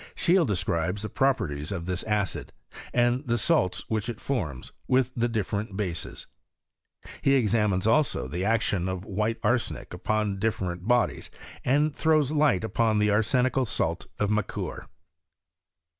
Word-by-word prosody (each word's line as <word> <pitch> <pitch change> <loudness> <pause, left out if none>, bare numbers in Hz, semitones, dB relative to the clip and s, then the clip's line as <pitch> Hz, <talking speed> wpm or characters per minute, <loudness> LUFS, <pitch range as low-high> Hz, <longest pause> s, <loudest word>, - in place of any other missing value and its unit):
Scheele 175 -3 +3
describes 90 0 -1
the 110 - -3
properties 105 - 0
of 85 -4 -4
this 90 0 -1
acid, 105 -3 -1 0.4
and 120 +2 +2
the 120 0 +2
salts 95 -4 +1
which 110 +1 -2
it 120 - -5
forms, 80 - -3 0.2
with 130 -1 +2
the 120 -1 +1
dif 110 -4 -2
ferent 100 -1 -3
bases. 90 -6 -3 1.0
He 135 - +4
examines, 105 -6 +2
also, 135 - +2
the 85 +7 -3
action 105 -4 +1
of 95 0 -4
white 105 +3 -1
arsenic 100 - 0
upon 105 +2 -1
different 95 -4 -2
bodies, 120 0 +1 0.3
and 145 +3 +2
throws 155 -3 +2
light 145 -10 +2
ton 115 -2 +2
the 105 0 +3
arsenical 125 +4 +2
salt 85 -5 -1
of 105 0 0
Macquer. 105 -2 -3
110 Hz, 145 wpm, -27 LUFS, 95-125 Hz, 1.0 s, He